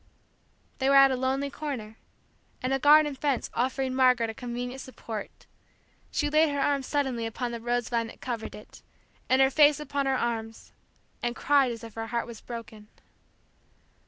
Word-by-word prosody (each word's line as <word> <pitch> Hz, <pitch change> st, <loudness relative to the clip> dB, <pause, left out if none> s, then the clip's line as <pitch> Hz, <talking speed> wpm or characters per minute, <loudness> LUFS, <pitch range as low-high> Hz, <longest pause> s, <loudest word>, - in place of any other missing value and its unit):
They 265 Hz, 0 st, +2 dB
were 275 Hz, -, +5 dB
at 275 Hz, 0 st, +8 dB
a -, -, +1 dB
lonely 265 Hz, +2 st, -1 dB
corner, 255 Hz, -9 st, -5 dB, 0.7 s
and 255 Hz, +1 st, 0 dB
a 270 Hz, -, +1 dB
garden 295 Hz, +1 st, +6 dB
fence 275 Hz, -1 st, -1 dB
offering 260 Hz, +1 st, -1 dB
Margaret 250 Hz, -3 st, +3 dB
a -, -, -11 dB
convenient 245 Hz, +2 st, -5 dB
support, 225 Hz, -5 st, -8 dB, 0.6 s
she 295 Hz, -, 0 dB
laid 310 Hz, +1 st, +4 dB
her 285 Hz, -1 st, -2 dB
arms 275 Hz, -1 st, 0 dB
suddenly 265 Hz, -6 st, -1 dB
upon 240 Hz, +2 st, -4 dB
the 235 Hz, -, -5 dB
rosevine 235 Hz, -1 st, -1 dB
that -, -, -13 dB
covered 235 Hz, -4 st, -5 dB
it, 210 Hz, -, -14 dB, 0.5 s
and 260 Hz, +1 st, +5 dB
her 265 Hz, -, +3 dB
face 295 Hz, 0 st, +5 dB
upon 285 Hz, -1 st, -2 dB
her 265 Hz, -1 st, +2 dB
arms, 225 Hz, -2 st, -4 dB, 0.5 s
and 240 Hz, 0 st, -2 dB
cried 280 Hz, -3 st, +3 dB
as 230 Hz, 0 st, -7 dB
if 225 Hz, -2 st, -9 dB
her 225 Hz, 0 st, -5 dB
heart 235 Hz, 0 st, -2 dB
was 235 Hz, -2 st, -10 dB
broken. 225 Hz, -3 st, -9 dB
255 Hz, 170 wpm, -27 LUFS, 235-275 Hz, 0.7 s, at